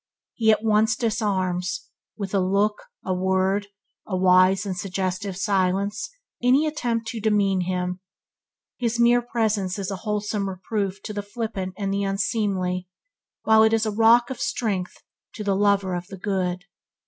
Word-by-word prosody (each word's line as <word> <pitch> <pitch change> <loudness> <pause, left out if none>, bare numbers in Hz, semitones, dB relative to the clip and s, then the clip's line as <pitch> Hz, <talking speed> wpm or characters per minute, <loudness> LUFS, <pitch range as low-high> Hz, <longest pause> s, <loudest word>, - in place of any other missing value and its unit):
He 220 -2 +1
at 215 - +1
once 220 0 +3
disarms, 190 -6 -1 0.3
with 200 -2 -5
a 200 - +3
look, 200 +3 +1 0.2
a 185 - 0
word, 190 +2 +1 0.4
a 185 - -1
wise 185 +1 +4
and 190 -2 -3
suggestive 185 0 -3
silence, 195 +1 0 0.3
any 260 +5 +4
attempt 240 -7 -1
to 230 - -4
demean 200 -3 +2
him. 180 0 -2 0.8
His 235 -1 -1
mere 240 +1 +5
presence 215 -6 -1
is 200 0 -3
a 195 - -3
wholesome 210 -1 -2
reproof 195 +1 -3
to 210 - -5
the 205 - -3
flippant 205 -3 -5
and 195 -1 -2
the 200 - 0
unseemly, 195 -2 -1 0.6
while 220 0 +5
it 220 0 +4
is 225 0 +2
a 215 - 0
rock 230 +4 +4
of 260 - -5
strength 195 -6 -2 0.3
to 215 - -5
the 200 -1 +1
lover 200 -2 +2
of 175 0 -4
the 195 - -9
good. 180 -2 -2
200 Hz, 160 wpm, -24 LUFS, 185-220 Hz, 0.8 s, mere